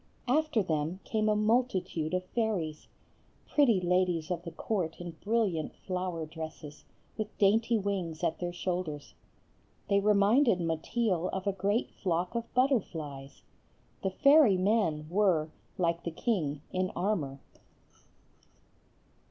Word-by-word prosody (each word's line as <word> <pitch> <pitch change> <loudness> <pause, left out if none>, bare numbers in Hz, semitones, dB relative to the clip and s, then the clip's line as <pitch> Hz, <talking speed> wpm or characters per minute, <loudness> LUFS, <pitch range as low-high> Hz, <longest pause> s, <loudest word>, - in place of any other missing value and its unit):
After 295 -4 +2
them 160 +1 -1
came 215 -2 0
a 210 - +3
multitude 210 -7 +1
of 185 0 -2
fairies; 185 -8 -2 0.6
pretty 245 -9 +4
ladies 180 -2 +1
of 175 -1 -1
the 175 - -7
court 175 -6 -2
in 175 -1 -6
brilliant 205 -8 0
flower 180 -3 -3
dresses, 155 -2 -9 0.3
with 215 0 -4
dainty 225 +3 +3
wings 185 -5 -3
at 165 -1 0
their 175 -1 -2
shoulders. 175 -4 -4 0.8
They 200 -1 +4
reminded 210 +2 +4
Mateel 175 +3 0
of 190 0 -4
a 200 - +1
great 200 +5 0
flock 180 0 -2
of 235 -1 -4
butterflies. 160 - -1 0.6
The 190 - 0
fairy 275 0 +5
men 185 -6 +1
were, 170 -4 +2 0.3
like 170 -1 0
the - - -2
king, 160 - -1
in 185 0 0
armor. 160 -9 -1
185 Hz, 125 wpm, -30 LUFS, 165-215 Hz, 0.8 s, fairy